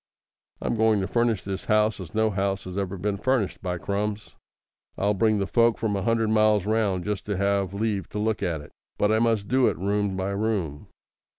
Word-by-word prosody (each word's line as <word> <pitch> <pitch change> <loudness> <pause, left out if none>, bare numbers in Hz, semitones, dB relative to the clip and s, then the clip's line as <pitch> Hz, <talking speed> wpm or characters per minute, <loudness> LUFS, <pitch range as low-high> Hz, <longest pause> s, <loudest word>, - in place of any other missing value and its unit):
I'm - - -1
going 110 -2 +3
to 95 - -2
furnish 115 -1 +1
this 95 -1 -5
house 110 0 +2
as 90 -1 -9
no 110 0 +2
house 95 0 -1
has 90 0 -7
ever 100 -1 -2
been 100 +2 -1
furnished. 115 -1 0
By 90 -1 -2
Crums! 105 +3 -3 0.6
I'll 100 +1 +2
bring 110 +2 +2
the 100 - 0
folk 115 +2 +3
from 110 -2 -1
a 100 - -1
hundred 115 +1 +1
miles 110 -2 +3
round 105 -5 0
just 105 -1 -2
to 100 -2 -1
have 100 -1 +1
leave 100 -3 -2
to - - -6
look 110 0 0
at 85 -4 -1
it. 75 - -14 0.3
But 105 - +2
I 110 - +3
must 110 -3 +1
do 130 -1 +3
it - - 0
room 100 0 -1
by 95 +1 -2
room. 100 -8 -2
105 Hz, 210 wpm, -25 LUFS, 95-110 Hz, 0.6 s, going